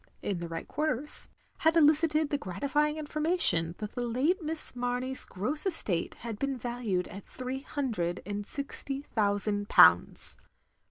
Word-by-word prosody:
in 195 -4 -2
the 170 - -5
right 165 0 -6
quarters, 300 -2 -1 0.3
had 320 +1 +2
elicited 310 0 +3
the 290 - +1
gratifying 295 - -1
information 300 - 0
that 210 -1 -6
the 245 - -5
late 270 - 0
Miss 315 -3 0
Mamey's 250 +1 -1
gross 265 - 0
estate 205 - -1
had 225 -3 -7
been 275 -1 -2
valued 235 -7 -3
at 195 +1 -10
three 255 +1 -6
hundred 220 - -3
and 205 +1 -4
sixty 280 -1 0
thotisand 205 -1 0
pounds. - - +6
255 Hz, 145 wpm, -29 LUFS, 205-300 Hz, 0.3 s, pounds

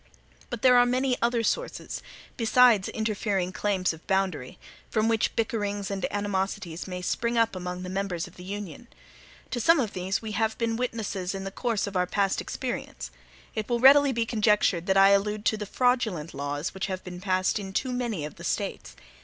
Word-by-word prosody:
But 240 0 -6
there 250 -1 +7
are 245 - +6
many 255 +1 +1
other 235 -1 +1
sources, - - -2 0.3
besides 230 -3 +4
interfering 205 -4 -1
claims 190 -3 0
of 160 - -14
boundary, 190 -9 -1 0.3
from 220 0 +1
which 225 -1 +1
bickerings 205 -3 -1
and 195 -2 -1
animosities 195 -4 -2
may 180 -1 -5
spring 235 +5 -1
up 230 -3 +2
among 180 0 -5
the - - -5
members 185 -3 -2
of - - -14
the 180 - -11
Union. 200 +3 -7 0.6
To 245 - -1
some 330 +7 +5
of 225 -6 -1
these 190 +1 -1
we 220 -1 -6
have 220 +2 0
been 230 -1 0
witnesses 215 -6 -3
in 195 - -5
the 195 - -5
course 230 0 -1
of 200 -1 -7
our 180 0 +2
past 195 0 0
experience. - - -5 0.4
It 215 +1 -4
will 240 -1 +1
readily 280 +2 +7
be 230 -2 0
conjectured 210 -6 +2
that 190 0 +3
I 195 0 +7
allude 210 +1 +1
to - - +3
the 210 -1 -5
fraudulent 220 -11 0
laws 145 +3 -3
which 190 - -3
have 185 -1 -4
been 180 -1 -8
passed 185 +1 +1
in 195 -1 -6
too 250 +6 -1
many 235 -11 -2
of 150 - -9
the - - -10
States. - - -3
205 Hz, 195 wpm, -27 LUFS, 185-230 Hz, 0.6 s, there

